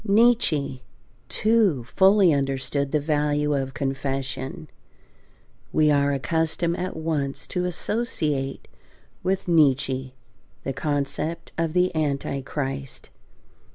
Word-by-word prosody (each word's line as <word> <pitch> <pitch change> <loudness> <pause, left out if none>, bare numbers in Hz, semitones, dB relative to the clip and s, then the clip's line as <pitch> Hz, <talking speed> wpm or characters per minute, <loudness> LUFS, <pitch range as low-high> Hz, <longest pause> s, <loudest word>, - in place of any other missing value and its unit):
Nietzsche, 200 - +3 0.5
too, 215 - +2
fully 190 - +4
understood 135 0 -1
the 150 - +2
value 150 0 +1
of 135 -1 -2
confession. 135 +2 -3 1.0
We 155 -1 +4
are 140 0 +3
accustomed 160 +4 0
at 185 +1 -3
once 150 -4 -2
to 180 0 -2
associate 160 - -2 0.5
with 190 +1 -1
Nietzsche 135 -5 +2 0.5
the 135 - -2
concept 145 +4 -2
of 165 -1 -1
the 180 -1 +2
Antichrist. 140 -2 -3
150 Hz, 95 wpm, -24 LUFS, 135-170 Hz, 1.0 s, fully